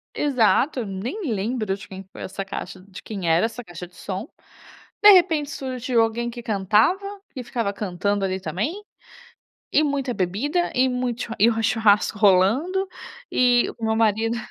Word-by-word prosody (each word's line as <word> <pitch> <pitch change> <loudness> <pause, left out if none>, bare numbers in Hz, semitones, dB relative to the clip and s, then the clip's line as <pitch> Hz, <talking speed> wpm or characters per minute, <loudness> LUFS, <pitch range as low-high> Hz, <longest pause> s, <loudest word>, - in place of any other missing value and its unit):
Exato, 255 -1 +2
nem 240 - -4
lembro 215 0 -2
de 200 +1 -12
quem 190 0 -9
foi - - -11
essa 195 +1 -5
caixa 190 -1 -7
de 190 0 -12
quem 195 -5 -5
era 165 +5 +4
essa 230 +2 -5
caixa 175 -3 -9
de 180 - -25
som. 195 +5 -5 0.8
De 415 - +11
repente 335 -6 +4
surgiu 255 -2 -1
alguém 230 +1 0
que 240 0 -8
cantava, 215 - +2 0.3
que 255 - -6
ficava 230 -4 -2
cantando 200 0 -1
ali 190 0 -2
também, 240 - -3 0.9
e 305 - +4
muita 280 -4 -1
bebida 245 - -1
e 260 +1 +3
muito 250 -1 -2
chu 225 - -5
e 225 +4 +6
o 225 -1 -1
churrasco 210 -1 +3
rolando, 225 - +3 0.4
e 245 -1 +3
o 225 - -3
meu 220 0 +1
marido, 225 +1 +1
225 Hz, 165 wpm, -23 LUFS, 195-255 Hz, 0.9 s, De